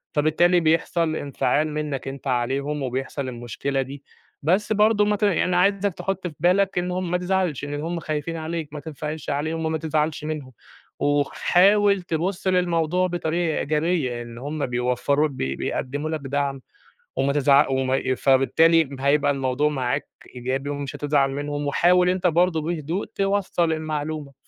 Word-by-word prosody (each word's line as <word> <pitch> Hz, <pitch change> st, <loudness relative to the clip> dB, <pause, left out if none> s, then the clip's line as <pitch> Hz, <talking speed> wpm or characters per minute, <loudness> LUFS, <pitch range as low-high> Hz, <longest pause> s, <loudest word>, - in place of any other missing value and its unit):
فبالتالي 160 Hz, +4 st, +3 dB
بيحصل 165 Hz, 0 st, +1 dB
انفعال 145 Hz, +1 st, 0 dB
منّك 150 Hz, -3 st, -3 dB
أنت 135 Hz, +1 st, -6 dB
عليهم 135 Hz, +4 st, -1 dB
وبيحصل 135 Hz, +2 st, -3 dB
المشكلة 125 Hz, +3 st, -3 dB
دي. 135 Hz, +2 st, -7 dB, 0.4 s
بس 200 Hz, +7 st, +2 dB
برضه 210 Hz, 0 st, +4 dB
ما 210 Hz, -, +2 dB
ت 210 Hz, -, -4 dB
يعني 180 Hz, -2 st, +2 dB
عايزك 200 Hz, +1 st, +2 dB
تحُط 185 Hz, +1 st, -3 dB
في 165 Hz, -, -8 dB
بالك 185 Hz, +4 st, +2 dB
إن 180 Hz, 0 st, 0 dB
هم 180 Hz, -1 st, -2 dB
ما 180 Hz, -, +2 dB
تزعلش، 180 Hz, -6 st, -1 dB
لإن 145 Hz, 0 st, -4 dB
هم 170 Hz, +1 st, -3 dB
خايفين 155 Hz, +1 st, -3 dB
عليك، 160 Hz, -1 st, -4 dB
ما 150 Hz, -, -5 dB
تنفعلش 155 Hz, 0 st, -6 dB
عليهم 160 Hz, +3 st, -2 dB
وما 160 Hz, 0 st, 0 dB
تزعلش 155 Hz, -1 st, -1 dB
منهم، 150 Hz, -4 st, -5 dB, 0.5 s
وخ 145 Hz, -1 st, +1 dB
حاول 200 Hz, +2 st, +4 dB
تبُص 175 Hz, +3 st, -2 dB
للموضوع 180 Hz, -1 st, +2 dB
بطريقة 170 Hz, -1 st, -1 dB
إيجابية 150 Hz, -5 st, 0 dB
إن 120 Hz, 0 st, -10 dB
هم 145 Hz, +3 st, -3 dB
بيوفّروا 125 Hz, +4 st, +1 dB
بي 70 Hz, -, -3 dB
بيقدّموا 145 Hz, +4 st, -3 dB
لك 160 Hz, -1 st, -2 dB
دعم 140 Hz, 0 st, -2 dB, 0.6 s
وما 140 Hz, +1 st, +1 dB
تزع 140 Hz, 0 st, +4 dB
وما 130 Hz, 0 st, +1 dB
ي 130 Hz, -1 st, -1 dB
فبالتالي 160 Hz, +5 st, +4 dB
م 135 Hz, -2 st, -10 dB
هيبقى 145 Hz, +1 st, +3 dB
الموضوع 135 Hz, +2 st, 0 dB
معاك 135 Hz, -1 st, -2 dB, 0.3 s
إيجابي 130 Hz, +3 st, -3 dB
ومش 145 Hz, -1 st, -4 dB
هتزعل 145 Hz, -2 st, +1 dB
منهم 145 Hz, +1 st, -3 dB
وحاول 180 Hz, +5 st, +4 dB
أنت 185 Hz, 0 st, 0 dB
برضه 170 Hz, -1 st, +2 dB
بهدوء 165 Hz, +3 st, -3 dB
توصّل 195 Hz, -4 st, +1 dB
المعلومة، 155 Hz, -2 st, -3 dB
155 Hz, 155 wpm, -23 LUFS, 140-175 Hz, 0.6 s, برضه